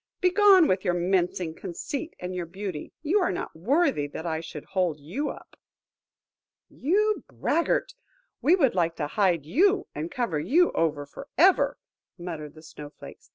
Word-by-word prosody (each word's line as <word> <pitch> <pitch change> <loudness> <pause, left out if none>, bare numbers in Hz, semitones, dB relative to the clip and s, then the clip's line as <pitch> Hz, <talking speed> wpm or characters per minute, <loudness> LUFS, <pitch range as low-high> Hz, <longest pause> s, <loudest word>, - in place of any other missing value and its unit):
Begone 375 -2 +6
with 185 0 +1
your 180 -3 +1
mincing 175 -2 0
conceit 270 - -6
and 180 +1 -5
your 180 -2 -4
beauty, 185 -3 -6
you 345 +7 +2
are 365 - +1
not 175 - -5
worthy 200 - +1
that 160 +3 -7
I 160 -2 -1
should 160 -2 -8
hold 180 -6 -1
you 195 - -3
up." - - -10 1.1
"You 420 +9 +1
braggart! 335 - 0 0.5
we 345 +6 +4
should 270 -9 +3
like 170 -2 0
to 150 - -2
hide 175 -2 +1
you 380 - +3
and 155 +3 -4
cover 195 -11 -2
you 335 - +3
over 150 -3 0
for 210 - -11
ever," 365 +4 +4 0.4
muttered 165 -4 -7
the 155 - -14
Snow 150 -2 -10
flakes. - - -14
185 Hz, 160 wpm, -26 LUFS, -, 1.1 s, Begone